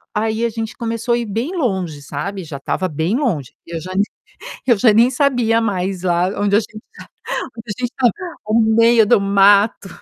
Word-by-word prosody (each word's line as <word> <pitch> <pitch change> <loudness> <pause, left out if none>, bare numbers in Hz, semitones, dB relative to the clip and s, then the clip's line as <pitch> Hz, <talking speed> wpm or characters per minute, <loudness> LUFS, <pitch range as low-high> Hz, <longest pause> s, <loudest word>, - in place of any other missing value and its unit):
Aí, 220 +2 0
a - - +1
gente 225 0 -5
começou 230 +1 -1
a - - 0
ir 240 - -2
bem 230 - -3
longe, 190 - -2
sabe, 185 +8 -5
já 150 -3 -7
estava 185 +7 -2
bem 160 +5 -1
longe, 175 - -2
eu 165 -1 -6
já 185 +3 -7
nem 200 - +3 0.6
eu 240 -5 +4
já 225 +3 +5
nem 230 +4 +4
sabia 245 -4 +2
mais 190 -4 -2
lá 175 0 +2
onde 205 0 +2
a - - +4
gente 215 -1 -10 0.5
tá, - - -1
onde 225 - -11
a - - -2
gente 245 -1 -1
estava, 255 -3 +2 0.4
no 220 +2 +3 0.2
meio 230 -1 +5
do 230 0 +4
mato, 200 +1 +3
215 Hz, 205 wpm, -18 LUFS, 185-235 Hz, 0.6 s, já